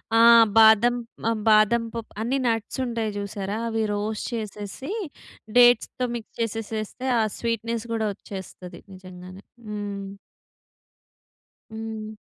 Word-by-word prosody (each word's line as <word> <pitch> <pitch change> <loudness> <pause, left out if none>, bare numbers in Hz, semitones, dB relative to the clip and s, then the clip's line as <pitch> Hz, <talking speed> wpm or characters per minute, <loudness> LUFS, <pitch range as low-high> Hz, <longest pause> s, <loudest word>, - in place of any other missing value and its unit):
ఆ! - - +5 0.4
బాదం 220 +2 +7 0.3
మ - - -5 0.2
బాదం 215 +2 +5
పప్ 230 -1 -6
అన్నీ 255 +4 0
నట్సుంటయి 230 0 -1
చూశారా? 200 0 -4
అవి 225 -1 -1
రోస్ట్ 210 +1 -3
చేసేసీ, 215 - -6 0.7
డేట్స్‌తో 245 +1 +5
మిక్స్ 230 -2 -9
చేసెసేస్తే 225 +2 -3
ఆ - - +4 0.2
స్వీట్‌నెస్ 230 0 -2
గూడా 220 -1 0
ఒచ్చేస్తది. 190 -3 -9 0.2
నిజంగానే. 185 +1 -12 0.2
హ్మ్. 205 -1 -5 1.7
హ్మ్. 220 -1 -6
220 Hz, 100 wpm, -24 LUFS, 205-230 Hz, 1.7 s, బాదం